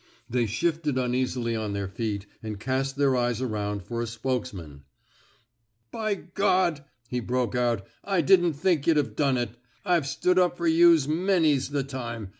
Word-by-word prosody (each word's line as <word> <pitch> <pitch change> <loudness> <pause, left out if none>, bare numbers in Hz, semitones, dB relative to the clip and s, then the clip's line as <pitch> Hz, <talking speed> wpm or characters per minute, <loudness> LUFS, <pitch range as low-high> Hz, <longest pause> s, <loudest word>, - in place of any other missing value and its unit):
They 120 -1 0
shifted 150 +5 -1
uneasily 125 -2 -1
on 110 -2 -3
their 100 -1 -2
feet 105 -1 -3 0.2
and 110 -2 -6
cast 135 +3 -1
their 140 -2 +2
eyes 120 -2 0
around 105 -5 -3
for 115 +5 -4
a 120 - -2
spokesman. 110 - -4 1.1
By 215 -2 -1 0.2
G 180 -6 +2
,*' 120 -1 -39
he 125 - 0
broke 125 +1 -1
out, 120 -5 0 0.2
I 195 -3 +1
didn't 175 0 +4
think 155 -1 0
yuh'd 165 -2 +4
Ve 125 -7 0
done 135 +1 +1
it. 120 -3 -2 0.3
IVe 175 -6 +2
stood 180 +6 +2
up 180 -1 +2
fer 170 - -3
youse 165 -3 +5
many's 160 -4 +2
the 145 -1 -1
time. 120 -6 -6
130 Hz, 170 wpm, -26 LUFS, 115-160 Hz, 1.1 s, youse